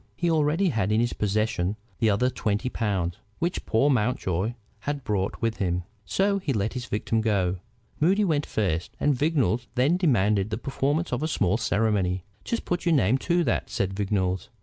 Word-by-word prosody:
He 175 Hz, -1 st, 0 dB
already 160 Hz, +4 st, +2 dB
had 110 Hz, -, 0 dB
in 110 Hz, -, +3 dB
his 120 Hz, 0 st, +1 dB
possession 105 Hz, -2 st, 0 dB, 0.2 s
the 110 Hz, -, +3 dB
other 125 Hz, +6 st, +2 dB
twenty 105 Hz, +2 st, -1 dB
pounds 95 Hz, -8 st, -1 dB, 0.2 s
which 175 Hz, +2 st, -2 dB
poor 115 Hz, +5 st, +3 dB
Mountjoy 110 Hz, -4 st, 0 dB, 0.2 s
had 145 Hz, -1 st, -3 dB
brought 100 Hz, -4 st, -1 dB
with 115 Hz, -1 st, 0 dB
him. 90 Hz, -2 st, -1 dB, 0.2 s
So 200 Hz, +1 st, +1 dB
he 155 Hz, -8 st, -1 dB
let 110 Hz, -1 st, 0 dB
the 125 Hz, -, -4 dB
victim 115 Hz, -1 st, -1 dB
go. 95 Hz, -4 st, +1 dB, 0.4 s
Moody 195 Hz, +7 st, +3 dB
went 150 Hz, -5 st, 0 dB
first, 90 Hz, -6 st, -1 dB
and 145 Hz, -, +3 dB
Vignolles 125 Hz, -, +1 dB
then 135 Hz, +8 st, +3 dB
demanded 105 Hz, -, +2 dB
the 110 Hz, -, -2 dB
performance 140 Hz, +5 st, -1 dB
of 125 Hz, -, -1 dB
a 155 Hz, -, 0 dB
small 100 Hz, -, +1 dB
ceremony. 100 Hz, -5 st, +1 dB, 0.2 s
"Just 235 Hz, -, -3 dB
put 175 Hz, 0 st, -1 dB
your 170 Hz, -2 st, +3 dB
name 130 Hz, 0 st, +3 dB
to 175 Hz, +2 st, +1 dB
that," -, -, 0 dB
said 95 Hz, -1 st, -1 dB
Vignolles. 95 Hz, -2 st, -1 dB
115 Hz, 180 wpm, -26 LUFS, 100-145 Hz, 0.4 s, in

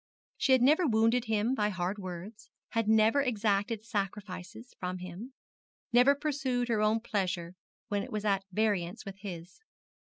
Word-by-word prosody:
She 265 Hz, -, +3 dB
had 255 Hz, -2 st, +5 dB
never 310 Hz, +6 st, +5 dB
wounded 230 Hz, +1 st, +3 dB
him 220 Hz, +2 st, +1 dB
by 210 Hz, -5 st, +1 dB
hard 185 Hz, +1 st, -2 dB
words, 185 Hz, +3 st, -8 dB, 0.2 s
had 225 Hz, -2 st, 0 dB
never 220 Hz, +5 st, +5 dB
exacted 215 Hz, -3 st, 0 dB
sacrifices 200 Hz, 0 st, -5 dB
from 180 Hz, 0 st, -3 dB
him, 185 Hz, +8 st, -8 dB, 0.6 s
never 250 Hz, +4 st, +6 dB
pursued 270 Hz, -4 st, -1 dB
her 220 Hz, -2 st, +2 dB
own 215 Hz, +1 st, +2 dB
pleasure 185 Hz, -6 st, -2 dB, 0.3 s
when 205 Hz, -3 st, -1 dB
it -, -, -7 dB
was 215 Hz, 0 st, -3 dB
at 195 Hz, -2 st, +2 dB
variance 190 Hz, -4 st, 0 dB
with 195 Hz, -1 st, -7 dB
his. 180 Hz, -3 st, -8 dB
215 Hz, 155 wpm, -30 LUFS, 190-235 Hz, 0.6 s, never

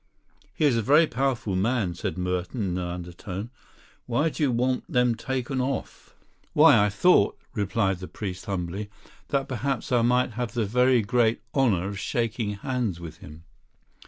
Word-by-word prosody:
"He 155 Hz, -, +1 dB
is 130 Hz, -5 st, +3 dB
a -, -, +2 dB
very 150 Hz, +9 st, +5 dB
powerful 125 Hz, -7 st, -1 dB
man," 105 Hz, -1 st, 0 dB
said 85 Hz, 0 st, -4 dB
Merton 90 Hz, +5 st, -2 dB
in 90 Hz, -, -2 dB
an 90 Hz, -, -3 dB
undertone. 90 Hz, +5 st, -6 dB, 0.6 s
"Why 140 Hz, +7 st, +1 dB
do 155 Hz, -, -7 dB
you 140 Hz, -4 st, +3 dB
want 125 Hz, +2 st, -1 dB
them 125 Hz, -1 st, +3 dB
taken 130 Hz, +2 st, -2 dB
off?" 135 Hz, +2 st, -4 dB, 0.4 s
"Why, 145 Hz, -8 st, +7 dB
I 105 Hz, -, +2 dB
thought," 105 Hz, -, +3 dB, 0.2 s
replied 100 Hz, -2 st, 0 dB
the 90 Hz, -, -7 dB
priest 95 Hz, -3 st, -6 dB
humbly, 95 Hz, +2 st, -3 dB, 0.4 s
"that 135 Hz, -1 st, 0 dB
perhaps 130 Hz, -1 st, -2 dB
I 120 Hz, -2 st, +4 dB
might 125 Hz, +2 st, +2 dB
have 120 Hz, +1 st, -4 dB
the 115 Hz, -2 st, +1 dB
very 125 Hz, +2 st, +3 dB
great 115 Hz, +1 st, +2 dB
honour 105 Hz, -10 st, +2 dB
of 100 Hz, -1 st, -5 dB
shaking 115 Hz, 0 st, -2 dB
hands 115 Hz, -4 st, -2 dB
with 80 Hz, -2 st, -9 dB
him." 80 Hz, -5 st, -12 dB
115 Hz, 165 wpm, -26 LUFS, 95-125 Hz, 0.6 s, Why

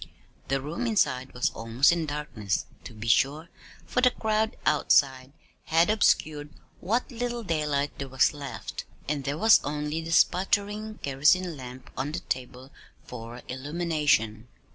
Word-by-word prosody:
The 135 Hz, 0 st, 0 dB
room 165 Hz, -, -3 dB
inside 130 Hz, -, +1 dB
was 125 Hz, -, +1 dB
almost 115 Hz, +6 st, +2 dB
in 170 Hz, -2 st, -1 dB
darkness, 130 Hz, -10 st, -3 dB, 0.2 s
to -, -, -8 dB
be 110 Hz, +2 st, -7 dB
sure, 140 Hz, +7 st, +2 dB, 0.4 s
for 250 Hz, -, 0 dB
the 250 Hz, -, +6 dB
crowd 220 Hz, -2 st, -1 dB
outside 135 Hz, -2 st, +3 dB, 0.3 s
had 165 Hz, +4 st, +3 dB
obscured 155 Hz, -8 st, +2 dB, 0.3 s
what 230 Hz, +9 st, -1 dB
little 240 Hz, 0 st, -3 dB
daylight 150 Hz, -5 st, 0 dB
there 135 Hz, -, -4 dB
was 130 Hz, +3 st, +3 dB
left, 145 Hz, -1 st, -7 dB, 0.2 s
and 140 Hz, -2 st, -2 dB
there 145 Hz, +1 st, -2 dB
was 220 Hz, +5 st, +6 dB
only 150 Hz, +2 st, -2 dB
the 165 Hz, 0 st, -6 dB
sputtering 205 Hz, +5 st, +1 dB
kerosene 150 Hz, +6 st, +2 dB
lamp 125 Hz, -1 st, -10 dB
on 140 Hz, +3 st, -3 dB
the 175 Hz, -, -3 dB
table 130 Hz, -1 st, -5 dB, 0.3 s
for 120 Hz, 0 st, -9 dB
illumination. 140 Hz, -6 st, 0 dB
150 Hz, 140 wpm, -27 LUFS, 130-175 Hz, 0.4 s, the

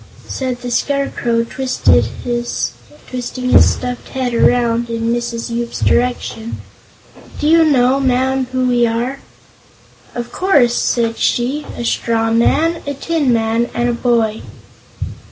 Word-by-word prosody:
Said 255 Hz, -2 st, -3 dB
the 245 Hz, -, -4 dB
Scarecrow, 240 Hz, -4 st, 0 dB
twisting 260 Hz, +2 st, +2 dB, 0.2 s
his 240 Hz, -1 st, -2 dB, 0.9 s
stuffed 250 Hz, 0 st, 0 dB
head 255 Hz, -2 st, -2 dB
around 235 Hz, 0 st, +2 dB
in 230 Hz, 0 st, -1 dB
Mrs. 235 Hz, -1 st, -3 dB
Yoop's 235 Hz, 0 st, -3 dB
direction: 240 Hz, -2 st, 0 dB, 0.8 s
"Do 295 Hz, -, -1 dB
you 330 Hz, +1 st, +6 dB
know, 265 Hz, -3 st, +3 dB
Ma'am, 260 Hz, 0 st, +1 dB
who 255 Hz, 0 st, 0 dB
we 240 Hz, -1 st, +3 dB
are?" 240 Hz, +4 st, -2 dB, 1.0 s
"Of 240 Hz, 0 st, -5 dB
course," 285 Hz, -11 st, +3 dB
said 230 Hz, -1 st, 0 dB
she; 260 Hz, +5 st, 0 dB
"a 240 Hz, -, -4 dB
straw 225 Hz, -1 st, 0 dB
man, 320 Hz, +9 st, +2 dB
a 285 Hz, -, -2 dB
tin 290 Hz, -1 st, 0 dB
man 230 Hz, +1 st, +1 dB
and 240 Hz, 0 st, +1 dB
a -, -, 0 dB
boy." 230 Hz, -3 st, +1 dB
245 Hz, 125 wpm, -17 LUFS, 235-265 Hz, 1.0 s, you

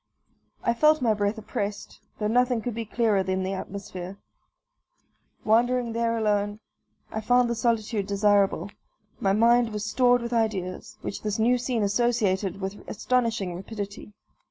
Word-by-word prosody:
I 235 Hz, -, +2 dB
felt 305 Hz, +5 st, +4 dB
my 230 Hz, -4 st, +2 dB
breath 205 Hz, +1 st, -1 dB
oppressed, 205 Hz, -1 st, -5 dB, 0.2 s
though 210 Hz, -, -3 dB
nothing 245 Hz, +2 st, +2 dB
could 245 Hz, -, -3 dB
be 230 Hz, +1 st, -4 dB
clearer 220 Hz, -3 st, +1 dB
than 190 Hz, 0 st, -1 dB
the 190 Hz, +1 st, -2 dB
atmosphere. 190 Hz, -1 st, -7 dB, 1.3 s
Wandering 240 Hz, +2 st, +2 dB
there 230 Hz, 0 st, 0 dB
alone, 205 Hz, -1 st, 0 dB, 0.5 s
I 220 Hz, -, -3 dB
found 245 Hz, +3 st, +3 dB
the 235 Hz, -, 0 dB
solitude 225 Hz, -3 st, 0 dB
desirable; 200 Hz, 0 st, +2 dB, 0.5 s
my 195 Hz, -1 st, +2 dB
mind 235 Hz, +2 st, +4 dB
was 210 Hz, 0 st, -4 dB
stored 245 Hz, +1 st, +3 dB
with 235 Hz, 0 st, -4 dB
ideas, 205 Hz, -6 st, -2 dB
which -, -, -5 dB
this 210 Hz, -1 st, -2 dB
new 245 Hz, +3 st, +3 dB
scene 240 Hz, -3 st, -1 dB
associated 205 Hz, -3 st, +1 dB
with 195 Hz, +2 st, -4 dB
astonishing 230 Hz, -6 st, 0 dB
rapidity. 200 Hz, +2 st, -7 dB
220 Hz, 145 wpm, -26 LUFS, 200-235 Hz, 1.3 s, felt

